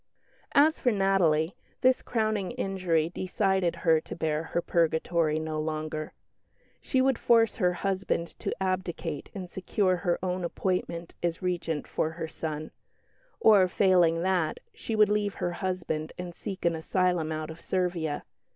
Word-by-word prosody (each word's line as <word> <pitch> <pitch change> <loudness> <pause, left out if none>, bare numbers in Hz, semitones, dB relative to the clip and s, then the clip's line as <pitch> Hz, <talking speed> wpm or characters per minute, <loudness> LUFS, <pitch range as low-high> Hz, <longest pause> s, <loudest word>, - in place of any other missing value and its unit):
As 310 +3 +5
for 245 - +2
Natalie, 190 -5 +2 0.3
this 255 0 +4
crowning 215 -3 -1
injury 185 -8 0
decided 190 -1 0
her 160 -2 +5
to - - -8
bear 155 -1 0
her 170 - -1
purgatory 165 -1 +1
no 155 -1 -3
longer. 155 0 -3 0.7
She 260 - +1
would 265 -2 +2
force 225 -2 +4
her 180 -1 +2
husband 190 -2 -1
to - - -2
abdicate 185 -5 -2
and 185 -2 -5
secure 185 +1 0
her 175 -1 0
own 180 0 -1
appointment 170 -1 -2
as 170 +1 -2
Regent 170 -4 -1
for 160 - -1
her 160 0 -4
son; 155 -1 -5 0.7
or, 205 -4 +6
failing 175 -3 +3
that, 180 -4 +1
she 225 - -4
would 210 -1 +5
leave 205 -1 0
her 175 - -2
husband 175 -4 -3
and 180 -1 -6
seek 190 +1 -6
an 170 -1 +3
asylum 170 0 0
out 155 0 -3
of 160 - -11
Servia. 175 -5 -1
180 Hz, 150 wpm, -28 LUFS, 160-195 Hz, 0.7 s, or